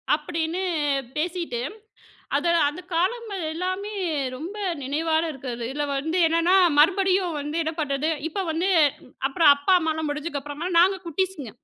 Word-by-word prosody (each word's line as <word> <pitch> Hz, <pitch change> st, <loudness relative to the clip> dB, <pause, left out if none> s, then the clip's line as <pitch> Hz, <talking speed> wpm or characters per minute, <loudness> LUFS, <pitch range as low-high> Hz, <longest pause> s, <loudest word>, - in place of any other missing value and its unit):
அப்படீன்னு 325 Hz, +3 st, -3 dB, 0.5 s
பேசிட்டு, 335 Hz, -5 st, -2 dB, 0.8 s
அத 290 Hz, -, -1 dB, 0.2 s
அந்தக் 355 Hz, +5 st, -8 dB
காலங்கள் 400 Hz, +2 st, -1 dB
எல்லாமே 370 Hz, +4 st, -3 dB, 0.4 s
ரொம்ப 340 Hz, +10 st, -7 dB, 0.3 s
நினைவால 315 Hz, +4 st, 0 dB
இருக்குறது. 250 Hz, -4 st, -6 dB
இதுல 295 Hz, +1 st, -2 dB
வந்து 320 Hz, +6 st, -1 dB
என்னன்னா 335 Hz, +3 st, +3 dB, 0.2 s
மறுபடியும் 370 Hz, +1 st, +3 dB
வந்து 295 Hz, +2 st, -4 dB
என்ன 320 Hz, 0 st, -2 dB
பண்றது? 285 Hz, 0 st, -1 dB, 0.2 s
இப்ப 385 Hz, +5 st, -3 dB
வந்து 335 Hz, +4 st, 0 dB, 0.6 s
அப்பறம் 290 Hz, +1 st, +6 dB
அப்பா, 285 Hz, +7 st, +2 dB
அம்மாலாம் 315 Hz, -1 st, -1 dB
முடிஞ்சக்கப்பறமா 290 Hz, +1 st, -4 dB
நாங்க 380 Hz, +3 st, +5 dB
குட்டிஸ்ங்க. 335 Hz, -, -2 dB
325 Hz, 125 wpm, -24 LUFS, 295-365 Hz, 0.8 s, அப்பறம்